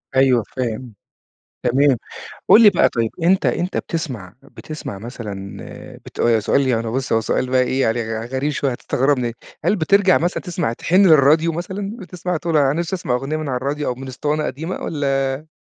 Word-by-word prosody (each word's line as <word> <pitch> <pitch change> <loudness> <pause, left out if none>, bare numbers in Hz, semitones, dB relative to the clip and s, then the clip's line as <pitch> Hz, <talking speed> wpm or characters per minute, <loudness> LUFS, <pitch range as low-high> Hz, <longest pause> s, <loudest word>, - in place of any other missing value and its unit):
أيوه 130 -3 +4
فاهم. 125 -1 -3 0.7
تمام، 135 +1 +3 0.5
قل 230 - +8
لي 210 - +9
بقى - - +3
طيب 115 -2 -1
أنت 185 +3 +3
أنت 180 +2 -1
بتسمع 125 - -4
بتسمع 140 -4 -8
مثلًا 105 -4 -7 0.5
بت 115 -1 +1
سؤال 135 +5 +1
يعني 115 -2 0
بُص 130 +3 -2
هو 115 - +3
سؤال 125 +3 -1
بقي 130 0 +3
إيه 130 +1 0
عل 115 0 -2
غريب 130 +4 -2
شوية 140 -1 -1
هتستغربني. 125 -1 0 0.3
هل 210 - +2
بترجع 190 +2 +4
مثلًا 175 +3 -1
تسمع 170 - -2
تحن 185 +10 +3
للراديو 155 +1 +5
مثلًا؟ 195 +5 -5
بتسمع 180 0 -4
تقول 165 0 -1
أنا 140 -2 +4
نفسي 170 +4 -2
أسمع 130 -8 -2
أغنية 135 +5 -2
من 155 -1 -4
على 130 - -1
الراديو 140 +3 -2
أو 125 - -1
من 130 +2 -9
اسطوانة 150 +4 -2
قديمة 160 +6 -4
والا؟ 135 -1 -1
135 Hz, 175 wpm, -20 LUFS, 125-165 Hz, 0.7 s, لي